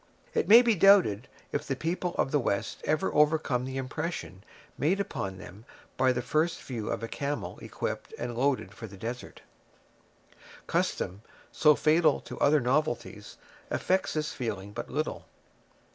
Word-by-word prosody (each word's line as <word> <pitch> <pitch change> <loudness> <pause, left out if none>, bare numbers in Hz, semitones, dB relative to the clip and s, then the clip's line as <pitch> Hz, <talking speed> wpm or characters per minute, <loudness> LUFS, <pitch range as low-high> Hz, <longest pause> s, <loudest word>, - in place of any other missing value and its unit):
It - - +1
may 230 +4 +9
be 235 -2 +4
doubted 185 - +5 0.2
if - - -3
the 135 - -1
people 175 +4 -2
of 135 - 0
the 145 - +3
West 105 -4 -2
ever 155 +5 0
overcome 150 -4 +2
the 130 0 -5
impression 135 - -4 0.3
made 180 +7 +1
upon 95 - -3
them 95 +3 -11 0.3
by 130 -1 +3
the 125 -1 -2
first 155 +6 0
view 115 -5 -5
of - - -3
a - - -2
camel 120 -10 -4
equipped - - -5
and 120 -1 -4
loaded 125 -7 0
for 110 +3 -8
the 100 -1 -12
desert. 120 +5 -7 1.2
Custom, 95 +3 -1 0.3
so 150 -1 +5
fatal 155 +3 +3
to - - -9
other 150 +1 +4
novelties, 120 -5 -1 0.3
affects 190 +1 0
this 150 -1 -1
feeling 105 -5 -4
but - - -6
little. - - -3
130 Hz, 155 wpm, -29 LUFS, 110-155 Hz, 1.2 s, may